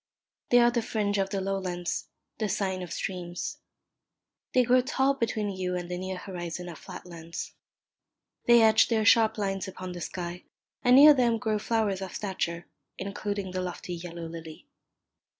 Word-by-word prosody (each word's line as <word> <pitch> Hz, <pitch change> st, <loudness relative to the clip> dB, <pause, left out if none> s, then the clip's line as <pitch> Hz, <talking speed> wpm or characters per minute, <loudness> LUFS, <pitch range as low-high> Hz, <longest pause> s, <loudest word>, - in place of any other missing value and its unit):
They 245 Hz, -, +6 dB
are 240 Hz, 0 st, +6 dB
the 235 Hz, -1 st, +1 dB
fringe 205 Hz, -2 st, -1 dB
of 195 Hz, 0 st, 0 dB
the 195 Hz, -, -2 dB
low 195 Hz, 0 st, -1 dB
lands, 175 Hz, -2 st, -3 dB, 0.3 s
the 215 Hz, -2 st, 0 dB
sign 190 Hz, -2 st, -1 dB
of 175 Hz, -3 st, -7 dB
streams. 175 Hz, -1 st, -4 dB, 1.0 s
They 255 Hz, -, +5 dB
grow 250 Hz, +1 st, +4 dB
tall 265 Hz, +2 st, +2 dB
between 220 Hz, -5 st, -1 dB
you 185 Hz, -1 st, -2 dB
and 175 Hz, 0 st, -4 dB
the 180 Hz, -, -2 dB
near 185 Hz, 0 st, -4 dB
horizon 180 Hz, -2 st, -6 dB
of 165 Hz, -, -9 dB
flat 180 Hz, -2 st, -9 dB
lands. 170 Hz, -1 st, -7 dB, 0.9 s
They 235 Hz, -1 st, +7 dB
etch 220 Hz, 0 st, +6 dB
their 220 Hz, -2 st, +1 dB
sharp 225 Hz, +1 st, +5 dB
lines 195 Hz, -2 st, -2 dB
upon 185 Hz, -1 st, -7 dB
the 175 Hz, -1 st, -7 dB
sky; 175 Hz, 0 st, -5 dB, 0.4 s
and 245 Hz, 0 st, +6 dB
near 295 Hz, +3 st, +10 dB
them 240 Hz, -4 st, +2 dB
grow 220 Hz, -2 st, -1 dB
flowers 215 Hz, -3 st, 0 dB
of 190 Hz, -2 st, -6 dB
stature, 175 Hz, -4 st, -3 dB, 0.3 s
including 200 Hz, 0 st, -3 dB
the 185 Hz, 0 st, -2 dB
lofty 180 Hz, 0 st, -5 dB
yellow 170 Hz, 0 st, -7 dB
lily. 165 Hz, -1 st, -9 dB
195 Hz, 170 wpm, -28 LUFS, 180-220 Hz, 1.0 s, near